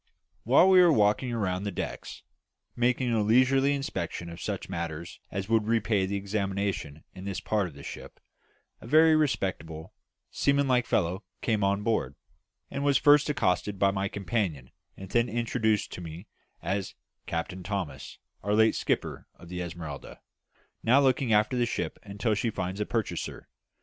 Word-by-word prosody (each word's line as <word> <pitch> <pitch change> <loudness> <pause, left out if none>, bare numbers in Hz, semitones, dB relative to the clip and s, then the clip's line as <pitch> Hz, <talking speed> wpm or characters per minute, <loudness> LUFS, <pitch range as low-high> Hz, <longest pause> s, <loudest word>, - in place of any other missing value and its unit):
While 135 - +6
we 185 -1 +8
were 175 -2 +6
walking 110 0 +2
round 95 -5 -1
the 105 - -2
decks, 90 - -6 0.5
making 120 0 +1
a 110 - +2
leisurely 130 +6 +4
inspection 85 -10 -4
of 85 - -9
such - - -4
matters 85 0 -5
as 95 0 -4
would 110 -1 +2
repay 110 -3 +2
examination 100 -5 -2
in 95 0 -9
this 100 -2 -3
part 105 -3 0
of 80 - -12
the 70 - -11
ship, - - -9 0.6
a - - -11
very 155 +4 +6
respectable, 95 - -1 0.4
seaman 140 0 +2
like 125 -1 +2
fellow 90 -3 0 0.2
came 110 -5 +1
on 100 +1 +1
board, 115 0 0 0.6
and 140 - -3
was 140 -2 +4
first 145 +1 +5
accosted 105 -6 0
by 100 +1 +3
my 95 0 -1
companion 95 - -2 0.3
and 95 -1 -9
then 120 0 +2
introduced 115 -2 0
to - - -7
me 85 +3 -8 0.4
as 95 +3 -2 0.3
"Captain 90 +3 -3
Thomson, 85 -9 -5 0.2
our 105 +1 0
late 110 +1 +5
skipper - - -2
of 85 - -14
the 90 0 -4
Esmeralda; 80 -5 -7 0.6
now 125 +5 +5
looking 130 -3 +2
after 105 +3 +3
the 120 -1 +1
ship 85 -8 -3
until 105 +2 -2
she 110 +3 0
finds 95 -1 -4
a 105 - -1
purchaser. 105 -7 -3
105 Hz, 160 wpm, -28 LUFS, 90-120 Hz, 0.6 s, we